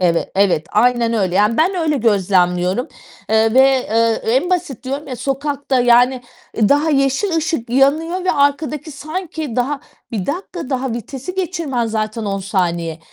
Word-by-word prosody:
Eve 170 -2 +1
evet, 190 -5 +2
aynen 235 +1 +2
öyle 190 -5 0
yani 210 +3 +3
ben 350 +5 +2
öyle 320 -4 0
gözlemliyorum, 190 -2 +1 0.4
eee, 220 +1 +3
ve, 260 - +7
eee, 230 -4 +2
en 355 +7 0
basit 350 -9 -2
diyorum 275 +3 -4
ya 255 - -5
sokakta, 275 +1 -1
yani, 245 +1 +4 0.3
daha 285 +8 +3
yeşil 275 +6 +1
ışık 320 -8 -2
yanıyor 315 +8 +2
ve 370 - +2
arkadaki 285 +1 0
sanki 310 -2 -5
daha, 275 +3 -1 0.3
bir 205 -6 -3
dakika 340 -2 -5
daha 260 -2 -1
vitesi 265 - -6
geçirmen 335 -10 -2
zaten 220 0 -3
10. 180 -5 -2
255 Hz, 145 wpm, -18 LUFS, 220-295 Hz, 0.4 s, ve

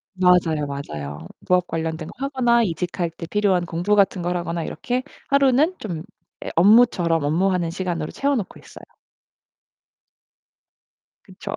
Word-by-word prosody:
맞아요, 175 -5 +3
맞아요. 75 - -6 0.2
부업 180 -1 +3
관련된 160 -1 -3
거 - - -10
하거나 245 -4 +2
이직할 175 -1 -2
때 165 - -8
필요한 190 -1 +1
공부 175 +5 0
같은 195 -2 +2
걸 175 +1 -1
하거나 170 -1 -3
이렇게 250 +8 -3 0.3
하루는 280 +5 +3
좀 170 -7 -5 0.4
예 - - -4
업무처럼 180 -5 +4
업무하는 175 +3 +1
시간으로 170 -3 -3
채워 280 0 0
놓고 210 -6 -5
있어요. - - -14 2.4
그쵸. - - -8
180 Hz, 305 characters per minute, -22 LUFS, 165-210 Hz, 2.4 s, 업무처럼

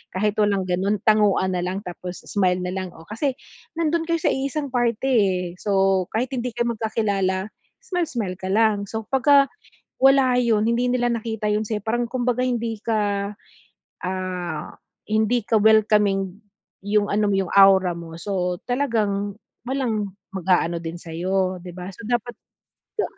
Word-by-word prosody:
kahit 210 +2 0
walang 205 -2 +2
ganun, 185 +3 0
tanguan 210 -3 +3
na 180 - -1
lang 185 +3 -3
tapos 180 -1 -7
smile 185 -3 +1
na 180 - -2
lang. 185 0 -4
O 160 - -13
kasi 240 - -2 0.4
nandon 330 0 0
kayo 335 0 +2
sa - - +3
iisang 275 +1 -2
party 245 +1 0
eh, 190 -3 +2 0.2
so 195 -2 +2
kahit 245 +4 0
hindi 250 -3 -3
kayo 235 0 0
magkakilala, 205 -3 -1 0.3
smile-smile 250 - -2
ka 185 - -5
lang. 210 -1 +2
So, 220 +1 -4
pagka 275 +1 +5 0.6
wala 270 -1 +5
yun, 225 -3 +2
hindi 235 +2 +1
nila 245 -1 +1
nakita 225 -1 -4
yun 210 +1 +1
sa'yo, 210 -1 -3
parang 240 +2 0
kumbaga 250 0 0
hindi 230 -3 -2
ka, 205 -3 0 0.8
ah, 180 -4 -3 0.4
hindi 220 +2 +1
ka 220 0 +2
welcoming, 205 -3 +3 0.4
yung 205 +1 +1
ano 210 +1 +2
mo, 200 - +2
yung 190 -2 -1
aura 195 -2 +6
mo, 170 -1 -8
so 180 0 -2
talagang 215 -6 -1 0.3
walang 225 -7 -1 0.2
mag-aano 180 -2 +1
din 165 0 -5
sa'yo 185 +3 -1
'di 180 - -9
ba, 185 +1 -7
so 205 - -12
dapat, 240 0 0 0.7
da 425 - +1
210 Hz, 155 wpm, -23 LUFS, 190-240 Hz, 0.8 s, aura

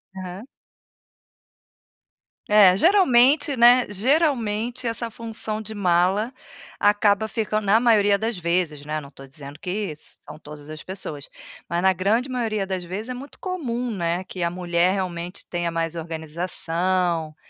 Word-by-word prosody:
Aham. 190 +4 -8 2.0
É, 200 -3 +7
geralmente, 290 - +4
né, 245 +1 +6
geralmente 240 - 0
essa 230 0 -2
função 220 -1 -4
de 220 0 -8
mala 190 +5 +1 0.5
acaba 205 +1 +3
ficando 215 0 -2
na 200 +3 +5
maioria 210 -4 +4
das 220 +1 -3
vezes, 170 -4 -1
né, 155 0 -3
não 140 -1 -13
tô 135 -1 -13
dizendo 140 +1 -11
que 190 -1 -3 0.3
são - - -12
todas 150 -1 -12
as 155 0 -8
pessoas. 160 -7 -6 0.4
Mas 170 +1 0
na 190 +1 +4
grande 210 +8 0
maioria 225 -5 -1
das 185 -2 -4
vezes 205 +7 -6
é - - -2
muito 265 +3 -10
comum, 250 -10 -3
né, 175 -2 -2
que 185 -1 -6
a 170 - +1
mulher 175 0 +1
realmente 180 -2 -4
tenha 175 -1 -2
mais 165 0 -2
organização, 165 +1 -2
195 Hz, 140 wpm, -23 LUFS, 170-230 Hz, 2.0 s, É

